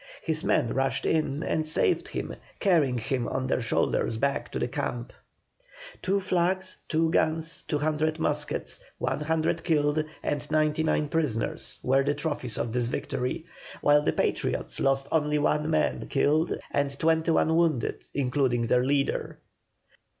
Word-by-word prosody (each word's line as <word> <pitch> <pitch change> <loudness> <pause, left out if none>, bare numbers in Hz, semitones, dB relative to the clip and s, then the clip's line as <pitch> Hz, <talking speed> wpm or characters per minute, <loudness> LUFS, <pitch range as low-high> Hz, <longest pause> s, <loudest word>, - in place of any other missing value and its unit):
His 160 -1 -1
men 120 - +1
rushed 135 0 0
in 155 -1 0
and 155 -1 0
saved 155 - +2
him, - - -4 0.3
carrying 155 - +3
him 120 +1 -2
on 130 - -2
their 130 - 0
shoulders 115 -1 0
back 140 +3 -1
to - - -3
the - - 0
camp. 120 -1 -4 0.9
Two 195 +2 +1
flags, 185 0 0
two 160 0 +2
guns, 160 +1 +1
two 150 - -2
hundred 155 +1 0
muskets, 150 -2 -1 0.2
one - - -2
hundred 160 +2 0
killed, 150 -2 +2 0.2
and 145 0 -2
ninety 155 0 +2
nine 155 -1 +1
prisoners, 145 -8 -1
were 135 +2 +3
the 145 +1 0
trophies 145 -6 -3
of 115 - -2
this 120 -1 +1
victory, 125 +5 -3 0.4
while 145 0 +5
the - - +1
Patriots - - -1
lost 135 0 +1
only 150 -1 +2
one 150 +1 +1
man 155 -1 0
killed 150 +4 +2
and 140 -1 0
twenty 160 +1 +2
one 160 0 +3
wounded, 165 -8 +1
including 130 -3 +1
their 125 +1 +3
leader. 140 +1 0
150 Hz, 150 wpm, -27 LUFS, 135-160 Hz, 0.9 s, while